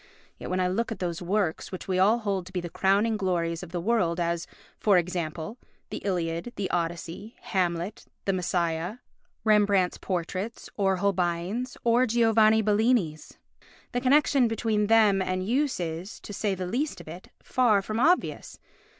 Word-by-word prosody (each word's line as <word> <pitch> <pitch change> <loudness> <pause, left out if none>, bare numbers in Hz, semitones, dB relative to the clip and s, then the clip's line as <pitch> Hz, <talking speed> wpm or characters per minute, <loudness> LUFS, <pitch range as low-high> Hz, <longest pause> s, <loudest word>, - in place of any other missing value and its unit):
Yet - - -6
when 185 - 0
I 180 - +2
look 225 +6 -1
at 225 - -3
those 175 -2 -3
works 180 -2 -1
which 185 - -7
we 185 -1 0
all 210 +5 +5
hold 200 -5 -2
to - - -11
be 185 - -2
the 175 -1 -6
crowning 205 +3 +2
glories 170 -4 -1
of 180 - -8
the 175 0 -3
world 180 -4 +1
as, 170 0 -1 0.3
for 200 -3 +4
example, 175 +3 -3 0.3
the - - -4
Iliad, 175 +3 -2
the 195 - -3
Odyssey, 175 +5 -3
Hamlet, 180 +1 -2 0.2
the 195 - +1
Messiah, 175 0 -1 0.5
Rembrandt's 205 -4 +3
portraits, 185 +4 -4
or 195 -2 +2
Holbein's, 185 +5 -1
or 240 +2 +3
Giovanni 220 -1 +4
Bellini's, 210 -7 +1 0.5
the 245 - -1
connection 275 -1 +4
between 220 -2 0
them 215 -3 +5
and 185 0 -1
use 270 +2 +1
is, 170 +3 -5
to 205 - -8
say 200 -1 -1
the 185 0 -4
least 255 +6 -2
of 175 - -12
it, 170 +4 -10
far 220 -6 +3
from 215 +3 -3
obvious. 345 +8 +1
195 Hz, 165 wpm, -27 LUFS, 175-220 Hz, 0.5 s, all